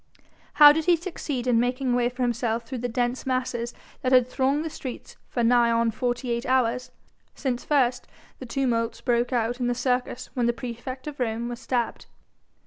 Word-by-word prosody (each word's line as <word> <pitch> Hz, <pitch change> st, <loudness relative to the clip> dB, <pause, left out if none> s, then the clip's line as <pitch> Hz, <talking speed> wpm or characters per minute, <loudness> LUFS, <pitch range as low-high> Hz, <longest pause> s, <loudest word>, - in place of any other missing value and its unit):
How 295 Hz, -1 st, +10 dB
did 315 Hz, +1 st, 0 dB
he 355 Hz, -, +5 dB
succeed 315 Hz, -7 st, -4 dB
in 245 Hz, -2 st, +3 dB
making 250 Hz, +1 st, 0 dB
a -, -, +3 dB
way 240 Hz, -1 st, +2 dB
for 250 Hz, +1 st, -4 dB
himself 235 Hz, -1 st, 0 dB
through 250 Hz, +2 st, -5 dB
the 245 Hz, +1 st, -2 dB
dense 245 Hz, +2 st, -1 dB
masses 250 Hz, -2 st, -1 dB, 0.3 s
that 255 Hz, -, 0 dB
had 250 Hz, -2 st, +6 dB
thronged 270 Hz, +4 st, 0 dB
the -, -, -2 dB
streets 255 Hz, -4 st, -8 dB
for 240 Hz, -, -1 dB
nigh 240 Hz, 0 st, +4 dB
on 230 Hz, 0 st, +2 dB
forty 245 Hz, +2 st, -2 dB
eight 235 Hz, +3 st, -2 dB
hours, 250 Hz, -1 st, +1 dB, 0.5 s
since 250 Hz, -4 st, -2 dB
first 255 Hz, -4 st, +1 dB, 0.3 s
the 255 Hz, -, -8 dB
tumult 230 Hz, -2 st, -1 dB
broke 240 Hz, 0 st, +1 dB
out 240 Hz, 0 st, 0 dB
in 245 Hz, -, 0 dB
the 245 Hz, -, 0 dB
Circus 250 Hz, 0 st, -1 dB
when 245 Hz, -2 st, +1 dB
the 240 Hz, -, +2 dB
praefect 250 Hz, +2 st, -7 dB
of 295 Hz, -2 st, -7 dB
Rome 235 Hz, -1 st, -1 dB
was 240 Hz, -1 st, -6 dB
stabbed? 240 Hz, -2 st, -2 dB
245 Hz, 195 wpm, -25 LUFS, 235-260 Hz, 0.5 s, How